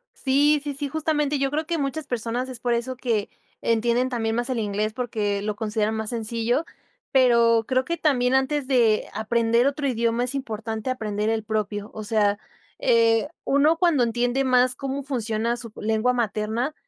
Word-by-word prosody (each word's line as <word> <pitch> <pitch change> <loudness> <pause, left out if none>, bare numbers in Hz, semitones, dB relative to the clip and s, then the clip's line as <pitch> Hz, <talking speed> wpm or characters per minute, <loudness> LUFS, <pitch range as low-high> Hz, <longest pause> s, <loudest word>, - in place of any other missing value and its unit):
Sí, 290 +2 +3
sí, 290 -1 -3
sí, 285 +1 -3
justamente 300 -1 0
yo 275 0 +1
creo 310 +2 -2
que 335 +1 -1
muchas 285 +1 -3
personas 245 0 -3
es 250 -3 -4
por 240 0 0
eso 245 +2 -2
que, 230 -5 -1 0.3
entienden 235 +3 +1
también 225 -3 -1
más 240 +2 -1
el 255 - -1
inglés, 210 0 -1
porque 210 -5 -2
lo 210 0 -2
consideran 215 0 -1
más 220 -1 -2
sencillo. 235 +5 -1 0.5
Pero, 235 -3 +4
creo 255 0 +1
que 340 0 -2
también 260 -5 +2
antes 265 +1 0
de 235 -5 +3
aprender 230 +2 +2
otro 280 0 -1
idioma, 235 -1 0
es 250 +2 -1
importante 225 -3 -4
aprender 215 -4 -2
el 225 -1 -1
propio. 210 -1 -3
O 215 - -6
sea, 205 -1 +1 0.4
eh, 230 -1 +3 0.2
uno 290 +4 +3
cuando 335 -7 +3
entiende 245 +3 0
más 255 -1 +3
cómo 275 0 -4
funciona 235 -3 -1
su 230 -3 -8
lengua 220 +3 +1
materna, 230 +3 -1
240 Hz, 175 wpm, -24 LUFS, 220-270 Hz, 0.5 s, Pero